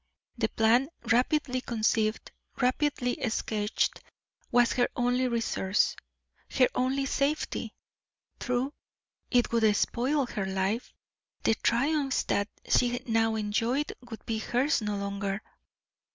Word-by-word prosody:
The 225 -3 0
plan, 235 +5 +3 0.2
rapidly 255 +1 +2
conceived, 220 -2 0 0.3
rapidly 255 -1 +1
sketched, 215 -1 -1 0.5
was 245 -1 +4
her 245 -1 +2
only 245 +1 +1
resource, 230 -5 +1 0.6
her 255 -2 +6
only 265 +2 0
safety. 280 +2 -1 0.6
True, 250 +3 -1 0.6
it 245 -1 +2
would 220 -3 +3
spoil 265 +6 +1
her 210 -5 -3
life, 190 +5 -1 0.5
the - - +4
triumphs 270 +5 +1
that 205 +1 0 0.2
she 245 0 +2
now 225 -1 +2
enjoyed 225 +7 0 0.2
would 225 -2 -9
be 225 -1 -2
hers 250 +5 +1
no 210 -1 -2
longer. 200 0 -3
240 Hz, 110 wpm, -29 LUFS, 220-255 Hz, 0.6 s, her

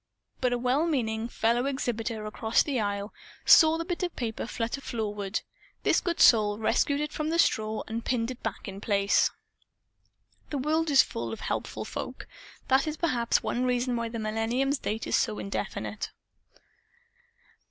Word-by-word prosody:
But 250 -1 +1
a 245 - +1
well 255 +7 +1
meaning 225 -7 -1
fellow 240 +2 +1
exhibitor, 230 -5 -2
across 220 +1 +1
the 275 -5 -1
aisle, 205 0 -2 0.3
saw 320 -2 +7
the 330 - -3
bit 350 +1 -3
of 360 -2 -2
paper 225 -2 -3
flutter 235 +4 -3
floorward. 210 -5 -3 0.4
This - - +3
good 345 -2 -2
soul 210 -3 +6
rescued 240 +6 +1
it 300 0 -3
from 305 0 -2
the 330 - 0
straw 220 -8 +1
and 225 +1 -4
pinned 240 -1 0
it 255 - -9
back 220 -3 -4
in 195 0 -7
place. 200 -2 +3 1.2
(The 290 - -2
world 310 +4 +1
is 280 -2 +7
full 230 - -5
of 225 - -6
helpful - - -3
folk. - - -6 0.4
That 270 +3 +3
is 310 0 -3
perhaps 250 -9 +1
one 245 - -1
reason 250 0 +1
why 230 -1 -2
the 230 - -5
Millennium's 230 +6 0
date 220 +1 -3
is - - +1
still 215 - +1
so - - -7
indefinite.) 200 - -4
235 Hz, 170 wpm, -28 LUFS, 220-275 Hz, 1.2 s, saw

